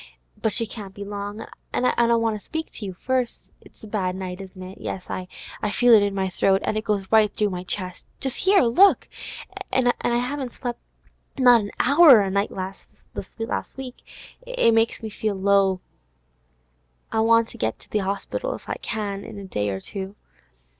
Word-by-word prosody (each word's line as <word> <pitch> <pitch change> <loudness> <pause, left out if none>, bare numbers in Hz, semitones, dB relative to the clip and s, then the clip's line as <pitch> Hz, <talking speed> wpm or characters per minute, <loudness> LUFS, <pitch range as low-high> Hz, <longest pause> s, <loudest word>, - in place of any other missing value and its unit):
But 220 - +1
she 230 +2 +2
can't 205 -3 -9
be 200 - -6
long, 205 +1 -5 0.3
an' 250 - 0
I 235 -1 +3
want 225 -2 0
to - - -26
speak 320 0 -5
to 215 - -8
you - - -4
first. 255 +4 -1 0.2
It's - - -20
a - - -8
bad 190 -4 -1
night, 185 0 -5
isn't 185 -1 -10
it? 185 +2 -10
Yes, 185 - -5
I 185 0 -4 0.4
feel 245 +3 +5
it 215 - +8
in 200 -1 0
my 190 -1 0
throat, 190 +1 +2
and 215 - 0
it 215 - -1
goes 205 -3 0
right 215 -2 +5
through 210 -1 0
my 180 -1 -4
chest—just 185 - -4
'ere, 390 -8 +6
look! 370 +13 +5 0.6
And 245 -2 +3
I 240 - +1
haven't 255 0 -3
slep' 240 -1 -5 0.6
not 245 -3 +7
a 205 - -5
hour 280 -3 +8
a 195 -1 -1
night 200 +1 +1 0.6
this - - -8
last 225 - -3
week; 260 -2 -7 0.4
it - - +2
makes 225 0 +2
me 220 - -4
feel 215 0 -2
that 190 - -7
low. 195 -2 +3 1.3
I 220 - +1
want 230 0 +4
to - - -12
get 110 0 -1
to - - -18
the 210 - +1
Orspital, 200 - -3
if - - -13
I - - -3
can, 200 -3 -3
in 220 -2 -9
a 200 - -7
day 105 - -2
or 95 -1 -3
two. 195 - -6
215 Hz, 195 wpm, -24 LUFS, 195-240 Hz, 1.3 s, it